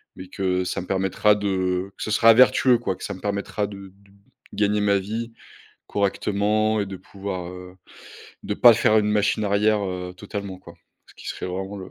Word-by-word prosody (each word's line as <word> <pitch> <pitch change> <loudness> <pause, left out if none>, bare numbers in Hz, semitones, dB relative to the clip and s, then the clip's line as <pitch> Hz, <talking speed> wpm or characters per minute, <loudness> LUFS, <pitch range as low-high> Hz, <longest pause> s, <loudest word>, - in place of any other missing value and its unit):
mais 95 - -10
que 95 -1 -1
ça 90 - -3
me 90 - -10
permettra 95 +2 +2
de 95 -2 -1
que - - -7
ce - - -4
sera 115 +2 +6
vertueux, 125 0 +5
quoi, 95 -6 -2
que - - -12
ça - - -4
me 95 - -11
permettra 100 0 -2
de 100 -1 -10
d 100 0 -25 0.4
de - - -12
gagner 105 0 +1
ma 100 -1 +3
vie 115 +4 -5 0.5
correctement 105 +2 0
et 100 - -2
de 95 -1 -7
pouvoir, 95 -1 -7
heu, 90 0 -11 0.7
de 105 - -2
pas 120 +1 +8
faire 110 -1 +3
une 105 0 +1
machine 105 +1 +1
arrière, 105 +1 +2
heu, 90 -1 -5
totalement, 100 -1 -6
quoi, - - -14 0.3
ce - - -18
qui - - -13
serait - - -5
vraiment 95 +2 -5
le 95 -1 -9
100 Hz, 200 wpm, -23 LUFS, 95-105 Hz, 0.7 s, pas